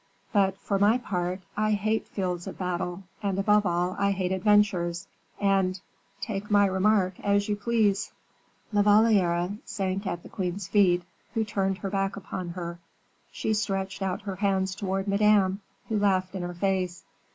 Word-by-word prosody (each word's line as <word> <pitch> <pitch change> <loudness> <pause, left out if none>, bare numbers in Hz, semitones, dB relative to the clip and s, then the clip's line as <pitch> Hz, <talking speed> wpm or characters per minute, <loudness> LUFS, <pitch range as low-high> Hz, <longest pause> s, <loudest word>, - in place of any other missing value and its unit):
But, 195 -2 +3
for 195 -1 -1
my 210 +4 +5
part, 185 -5 -3
I 215 0 +1
hate 215 +2 0
fields 180 -3 -3
of - - -7
battle, 180 0 -3 0.2
and 200 -2 -1
above 210 +1 +3
all 175 +1 0
I 200 - +3
hate 190 -2 -1
adventures, 190 -3 +2 0.3
and 195 -2 +2 0.4
take 210 -2 -4
my 205 -1 +5
remark 190 -1 +2
as 200 0 +1
you 210 - 0
please." 205 -2 +1 0.6
La 205 - +4
Valliere 205 -3 +3
sank 195 0 -3
at 175 -1 -3
the - - -10
queen's 185 0 -3
feet, 190 -3 +3 0.3
who 225 - +2
turned 195 -2 -1
her 195 -1 -5
back 195 0 0
upon 185 -2 -5
her. 170 -1 -6 0.5
She 220 - -1
stretched 195 -2 -2
out 190 0 -2
her 195 -2 -5
hands 190 -1 +1
towards 195 0 -2
Madame, 200 -1 +3 0.3
who 215 -2 0
laughed 185 -2 +1
in 190 - -4
her 175 0 -5
face. 185 -1 -1
195 Hz, 165 wpm, -27 LUFS, 185-205 Hz, 0.6 s, my